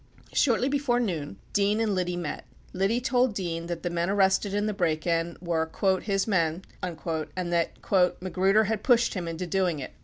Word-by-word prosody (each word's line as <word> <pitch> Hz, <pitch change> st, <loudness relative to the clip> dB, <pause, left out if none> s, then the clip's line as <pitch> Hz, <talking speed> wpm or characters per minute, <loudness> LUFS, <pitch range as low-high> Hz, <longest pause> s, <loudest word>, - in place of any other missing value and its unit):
Shortly 250 Hz, -1 st, +3 dB
before 275 Hz, -3 st, +1 dB
noon, 160 Hz, -, -3 dB, 0.2 s
Dean 205 Hz, +1 st, +2 dB
and 220 Hz, -2 st, +1 dB
Liddy 180 Hz, -1 st, -1 dB
met, 165 Hz, -4 st, -4 dB, 0.3 s
Liddy 195 Hz, +6 st, +1 dB
told 250 Hz, -2 st, +1 dB
Dean 170 Hz, -3 st, -3 dB
that 170 Hz, -1 st, -4 dB
the 175 Hz, -, -1 dB
men 170 Hz, +1 st, 0 dB
arrested 195 Hz, 0 st, +2 dB
in 205 Hz, +1 st, 0 dB
the 215 Hz, -, -1 dB
break 160 Hz, -5 st, 0 dB
in 170 Hz, 0 st, 0 dB
were 165 Hz, -2 st, -1 dB, 0.3 s
"his 195 Hz, -2 st, 0 dB
men" 170 Hz, -4 st, 0 dB, 0.2 s
and 170 Hz, 0 st, -3 dB
that 170 Hz, -1 st, -2 dB, 0.3 s
"Magruder 190 Hz, +3 st, +2 dB
had 215 Hz, 0 st, -1 dB
pushed 240 Hz, -1 st, +3 dB
him 180 Hz, -4 st, -4 dB
into 165 Hz, +2 st, -4 dB
doing 180 Hz, -2 st, 0 dB
it." 135 Hz, -, -6 dB
185 Hz, 180 wpm, -27 LUFS, 170-210 Hz, 0.3 s, Shortly